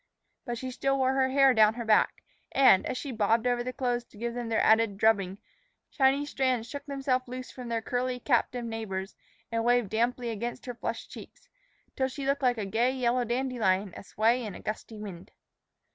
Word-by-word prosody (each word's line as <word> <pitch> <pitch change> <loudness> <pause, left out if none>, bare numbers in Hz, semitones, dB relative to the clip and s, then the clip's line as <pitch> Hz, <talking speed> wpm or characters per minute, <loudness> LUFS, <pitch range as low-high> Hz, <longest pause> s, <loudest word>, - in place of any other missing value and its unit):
But 240 -2 -3
she 255 +2 -5
still 275 +2 0
wore 260 0 +2
her 265 -1 +2
hair 270 0 +5
down 220 -1 +5
her 235 -1 -5
back, 215 -1 +2 0.3
and, 260 -9 +5
as 255 - -3
she 280 - -5
bobbed 225 +1 +1
over 245 -1 +1
the 255 - -3
clothes 245 -2 -1
to 210 - -19
give 235 +2 -3
them 240 -1 -4
their 225 - +1
added 220 -2 +4
drubbing, 200 -3 +2 0.5
shiny 275 +1 +2
strands 255 -5 0
shook 285 +4 -7
themselves 270 -2 -1
loose 255 +1 -7
from 250 -2 -8
their 230 -1 -1
curly, 250 +1 -2
captive 245 -1 0
neighbors 215 -4 -5 0.4
and 230 0 0
waved 240 -3 +2
damply 240 +1 0
against 235 +3 -5
her 245 - -4
flushing 235 - -5
cheeks, - - -12 0.5
till 265 - +1
she 270 +1 -6
looked 275 +1 0
like 250 -2 +2
a 210 - -2
gay 225 +5 +1
yellow 250 -1 +1
dandelion 230 -6 0
a - - -9
sway 230 +5 +1
in 205 -5 -6
a - - -9
gusty 215 +1 -6
wind. 195 -4 -8
240 Hz, 200 wpm, -28 LUFS, 220-255 Hz, 0.5 s, hair